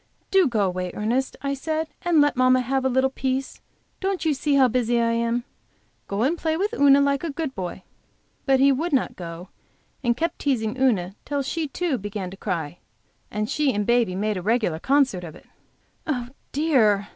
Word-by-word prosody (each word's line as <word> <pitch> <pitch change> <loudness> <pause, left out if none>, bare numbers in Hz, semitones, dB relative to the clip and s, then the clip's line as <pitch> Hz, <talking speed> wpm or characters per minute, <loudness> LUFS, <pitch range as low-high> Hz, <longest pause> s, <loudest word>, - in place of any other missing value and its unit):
"Do 385 -4 +5
go 230 -5 0
away, 185 -1 -1
Ernest," 240 +5 -1
I 275 0 0
said, 315 +3 -2
"and 340 -4 +3
let 290 0 +3
mamma 255 0 +4
have 265 +2 -1
a 265 - +2
little 260 +1 +2
peace. 265 0 -3 0.4
Don't 385 -2 -2
you 315 - +3
see 285 +1 0
how 265 -2 +6
busy 240 -1 +1
I 230 0 +2
am? 235 +1 0 0.6
Go 200 +3 -1
and 320 +6 +1
play 320 -1 0
with 410 +5 -1
Una 280 -8 +6
like 280 +1 +1
a 335 - -2
good 295 -1 -4
boy." 185 -2 -6 0.6
But 270 -1 +4
he 275 +1 +6
would 305 +5 -1
not 265 - +1
go, 175 +1 -8 0.5
and 240 -1 +1
kept 335 +4 -2
teasing 240 -5 0
Una 215 -9 +1
till 285 -1 -2
she 315 +3 -2
too, 285 -2 -2
began 200 -2 -5
to - - -8
cry, 175 -5 -4 0.5
and 210 +1 -2
she 295 +2 +1
and 205 0 0
baby 235 -5 +2
made 210 +1 -1
a - - -3
regular 210 -5 0
concert 265 - +2
of 160 -3 -8
it. - - -16 0.6
"Oh, 250 -5 -2 0.2
dear!" 225 -10 +2
255 Hz, 195 wpm, -24 LUFS, 210-285 Hz, 0.6 s, how